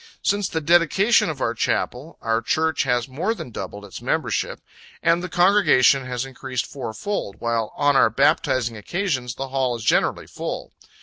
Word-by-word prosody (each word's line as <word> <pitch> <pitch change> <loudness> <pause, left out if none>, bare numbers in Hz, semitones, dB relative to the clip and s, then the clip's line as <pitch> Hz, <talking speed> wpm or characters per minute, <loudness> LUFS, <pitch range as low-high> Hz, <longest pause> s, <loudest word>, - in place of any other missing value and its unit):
Since 205 -1 +1
the 160 - -2
dedication 175 +7 +4
of 145 -4 -5
our 115 - +1
Chapel, 125 +5 -2
our 115 0 +1
Church 160 +5 0
has 125 -2 +1
more 165 - -2
than 125 - -8
doubled 100 0 -7
its 100 - -9
membership, - - -1 0.4
and 170 +1 +3
the 180 - -5
congregation 175 -8 +4
has 125 0 -3
increased 130 -2 -4
four 130 -5 -6
fold; 205 - -3
while 115 -2 -1
on 145 -1 +2
our 135 - +5
baptizing 130 -1 +1
occasions 130 - -2
the 135 0 -5
hall 130 -2 0
is 115 - -7
generally - - +1
full. - - -6
135 Hz, 170 wpm, -23 LUFS, 120-170 Hz, 0.4 s, our